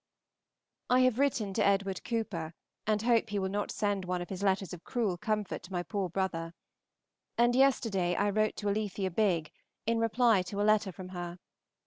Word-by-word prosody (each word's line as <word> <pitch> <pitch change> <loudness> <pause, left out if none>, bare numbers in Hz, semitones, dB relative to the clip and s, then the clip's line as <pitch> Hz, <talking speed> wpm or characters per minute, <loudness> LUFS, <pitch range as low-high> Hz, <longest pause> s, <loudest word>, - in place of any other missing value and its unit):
I 250 +1 +5
have 255 -1 +3
written 240 -8 +1
to 215 - +1
Edward 195 -1 +1
Cooper, 180 -9 -3 0.3
and 215 0 +1
hope 230 -1 +3
he 205 - -2
will 190 -1 0
not 205 +1 -1
send 205 -2 -1
one 180 0 -2
of 175 - -6
his 190 -1 -5
letters 195 -2 +1
of 175 - -9
cruel 220 -7 -1
comfort 210 +1 -2
to 180 - -13
my 175 -1 -1
poor 195 -1 -2
brother: 170 -2 -2 0.8
and 240 +1 +4
yesterday 220 -9 +3
I 205 +2 +1
wrote 215 +1 +1
to 205 - -4
Alethea 200 -2 -1
Bigg, 170 -6 +1 0.3
in 230 0 +1
reply 230 -2 +3
to 185 +3 -5
a - - +2
letter 215 -2 +3
from 185 +1 -9
her. 175 -1 -6
200 Hz, 185 wpm, -31 LUFS, 185-220 Hz, 0.8 s, I